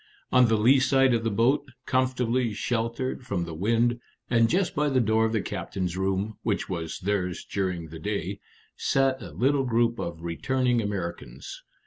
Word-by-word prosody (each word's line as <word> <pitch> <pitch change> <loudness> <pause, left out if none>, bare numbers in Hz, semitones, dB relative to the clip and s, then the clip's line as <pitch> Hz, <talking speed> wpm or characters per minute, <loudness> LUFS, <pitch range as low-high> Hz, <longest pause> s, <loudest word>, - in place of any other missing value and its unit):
On 125 -1 +6
the 110 -1 +3
lee 125 +6 +5
side 135 -1 +4
of 115 -1 +1
the 115 - +1
boat, 130 +7 +2 0.2
comfortably 125 -3 +1
sheltered 115 +5 -2
from 100 -8 -2
the 85 -1 -6
wind, 115 +7 +1 0.3
and 115 -1 +4
just 180 +1 +1
by 150 0 +1
the 130 -2 +2
door 110 -1 +3
of 110 - 0
the 110 -2 0
captain's 90 -1 -3
room 95 +3 -1
(which 105 -3 -1
was 85 -4 -4
theirs 90 -2 -1
during 90 -4 -3
the 80 +1 -9
day), 100 +1 -3 0.4
sat 135 -1 +1
a - - -7
little 135 +2 +1
group 115 -1 +1
of 85 -1 -5
returning 125 +8 0
Americans. 85 - -5
115 Hz, 170 wpm, -26 LUFS, 95-130 Hz, 0.4 s, On